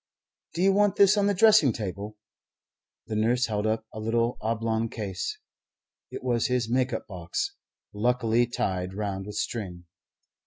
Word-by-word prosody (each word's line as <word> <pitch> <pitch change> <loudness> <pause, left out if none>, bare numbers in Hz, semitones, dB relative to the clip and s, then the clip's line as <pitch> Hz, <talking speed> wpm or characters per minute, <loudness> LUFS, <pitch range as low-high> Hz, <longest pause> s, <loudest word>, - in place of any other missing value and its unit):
"Do 175 - 0
you 195 0 +5
want 205 0 +3
this 200 +1 +6
on 200 -1 +2
the 205 - +2
dressing 215 - +6
table?" 105 0 -5 0.9
The 110 - -4
nurse 120 +4 +2
held 105 -1 -1
up 110 0 -1
a 110 - -6
little 115 +2 0
oblong 115 0 -1
case. 100 -5 -4 0.7
It - - -7
was 120 -3 +1
his 125 -2 0
make 130 +2 +1
up - - -3
box, 405 0 -4 0.4
luckily 120 +2 +2
tied 95 -5 -2
round 100 -2 -3
with 105 - -7
string. 90 -6 -4
115 Hz, 155 wpm, -27 LUFS, 105-125 Hz, 0.9 s, this